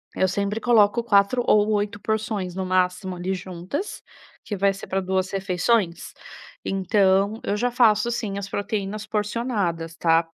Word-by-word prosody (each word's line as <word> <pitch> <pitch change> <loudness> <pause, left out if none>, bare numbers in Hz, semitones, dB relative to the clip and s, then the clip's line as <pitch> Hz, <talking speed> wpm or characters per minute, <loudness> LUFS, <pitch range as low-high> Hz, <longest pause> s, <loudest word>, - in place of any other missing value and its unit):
Eu 190 - +2
sempre 200 +3 -2
coloco 235 -1 +4
4 215 +2 +3
ou 210 0 +4
8 205 0 -1
porções, 215 -4 -2
no 190 0 -2
máximo, 185 0 0
ali 180 +2 -2
juntas, 185 - -5 0.4
que 210 - -3
vai 195 0 +2
ser 195 - -9
pra 195 0 -1
2 190 0 -1
refeições. 190 0 0 0.5
Então, 195 +2 +2
eu 205 - -1
já 245 +3 +1
faço 235 -3 +4
assim, 220 -4 -2
as 200 -1 -4
proteínas 205 +1 -3
porcionadas, 210 -6 -2
tá. 165 0 +3
200 Hz, 150 wpm, -24 LUFS, 185-215 Hz, 0.5 s, coloco